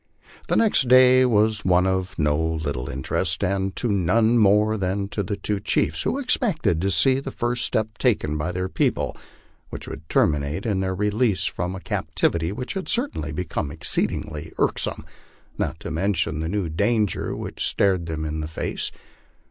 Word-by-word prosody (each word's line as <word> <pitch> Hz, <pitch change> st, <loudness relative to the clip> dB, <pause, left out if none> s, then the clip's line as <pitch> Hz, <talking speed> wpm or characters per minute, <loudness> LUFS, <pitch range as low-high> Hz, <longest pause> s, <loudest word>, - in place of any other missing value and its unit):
The -, -, +1 dB
next 210 Hz, -, +3 dB
day 130 Hz, +1 st, +7 dB
was 110 Hz, -2 st, +2 dB
one 90 Hz, 0 st, +3 dB
of 95 Hz, 0 st, -1 dB
no 75 Hz, -2 st, +2 dB
little 75 Hz, -5 st, -2 dB
interest, 75 Hz, +7 st, -1 dB
and 95 Hz, 0 st, -1 dB
to 120 Hz, -, -1 dB
none 110 Hz, +5 st, +3 dB
more 105 Hz, +1 st, +4 dB
than 100 Hz, 0 st, -1 dB
to 105 Hz, -, -2 dB
the 100 Hz, +1 st, -3 dB
two 100 Hz, +1 st, -1 dB
chiefs, 80 Hz, -5 st, 0 dB
who 265 Hz, -, 0 dB
expected 215 Hz, -, 0 dB
to 95 Hz, -, +1 dB
see 130 Hz, +7 st, +3 dB
the 135 Hz, -, -5 dB
first 120 Hz, -2 st, -1 dB
step 110 Hz, -1 st, -2 dB
taken 100 Hz, -, +1 dB
by 75 Hz, +4 st, -2 dB
their 90 Hz, +1 st, -2 dB
people -, -, -1 dB, 0.5 s
which -, -, -7 dB
would 80 Hz, +2 st, -9 dB
terminate 75 Hz, +6 st, +1 dB
in 105 Hz, -4 st, 0 dB
their 95 Hz, -1 st, -1 dB
release 105 Hz, -1 st, +1 dB
from 90 Hz, +2 st, -3 dB
a -, -, -6 dB
captivity 85 Hz, -2 st, -1 dB
which 125 Hz, +5 st, -5 dB
had 190 Hz, -1 st, -4 dB
certainly 235 Hz, -, +1 dB
become 75 Hz, -2 st, -3 dB
exceedingly 75 Hz, +2 st, -2 dB
irksome, -, -, 0 dB, 0.5 s
not 80 Hz, -, -2 dB
to -, -, -5 dB
mention 80 Hz, -2 st, 0 dB
the 80 Hz, +1 st, -2 dB
new 100 Hz, -2 st, -1 dB
danger 105 Hz, +5 st, 0 dB
which -, -, -5 dB
stared 95 Hz, -4 st, +1 dB
them 80 Hz, -1 st, -3 dB
in 80 Hz, 0 st, -3 dB
the 75 Hz, -, -3 dB
face. 80 Hz, -, -3 dB
95 Hz, 170 wpm, -23 LUFS, 80-110 Hz, 0.5 s, day